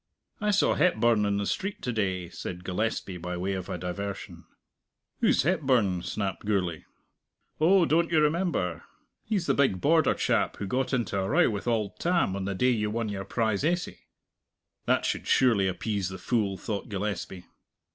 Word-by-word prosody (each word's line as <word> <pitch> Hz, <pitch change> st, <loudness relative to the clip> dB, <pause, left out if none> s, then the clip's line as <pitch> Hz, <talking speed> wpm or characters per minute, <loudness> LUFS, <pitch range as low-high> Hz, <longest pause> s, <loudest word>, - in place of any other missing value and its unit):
"I 210 Hz, -, 0 dB
saw 205 Hz, 0 st, +3 dB
Hepburn 120 Hz, -10 st, +3 dB
in 100 Hz, 0 st, +1 dB
the 100 Hz, -, -1 dB
street 195 Hz, -, -3 dB
to 125 Hz, -, -1 dB
day," 95 Hz, -5 st, -1 dB
said 90 Hz, 0 st, -7 dB
Gillespie, 95 Hz, 0 st, -2 dB
by 90 Hz, +1 st, -4 dB
way 95 Hz, +2 st, -2 dB
of 95 Hz, -2 st, -5 dB
a -, -, -3 dB
diversion. 95 Hz, +2 st, -6 dB, 0.7 s
"Who's -, -, +3 dB
Hepburn?" 130 Hz, -, +2 dB
snapped 100 Hz, +1 st, -3 dB
Gourlay. 95 Hz, -6 st, -1 dB, 0.7 s
"Oh, 175 Hz, +3 st, +5 dB
don't 165 Hz, +2 st, +2 dB
you 160 Hz, -, +4 dB
remember? 150 Hz, -, 0 dB, 0.4 s
He's 205 Hz, -5 st, -1 dB
the -, -, +2 dB
big 130 Hz, -10 st, +2 dB
Border 160 Hz, -, +3 dB
chap -, -, 0 dB
who 100 Hz, -, -4 dB
got 130 Hz, +6 st, -1 dB
into 115 Hz, -6 st, 0 dB
a 95 Hz, -, -1 dB
row 170 Hz, -3 st, +4 dB
with 100 Hz, +2 st, -5 dB
auld 110 Hz, -4 st, -1 dB
Tam 170 Hz, -, +1 dB
on 100 Hz, -1 st, -3 dB
the 100 Hz, 0 st, -2 dB
day 125 Hz, +7 st, +3 dB
you 105 Hz, -3 st, 0 dB
won 110 Hz, 0 st, -2 dB
your 95 Hz, -1 st, -4 dB
prize 110 Hz, 0 st, 0 dB
essay." 175 Hz, +3 st, -1 dB, 0.9 s
(That -, -, +2 dB
should -, -, -2 dB
surely 115 Hz, -7 st, +4 dB
appease 95 Hz, 0 st, -2 dB
the 95 Hz, -, -7 dB
fool, 105 Hz, -5 st, 0 dB
thought 105 Hz, +3 st, -4 dB
Gillespie.) 100 Hz, -2 st, -4 dB
105 Hz, 175 wpm, -28 LUFS, 95-140 Hz, 0.9 s, Oh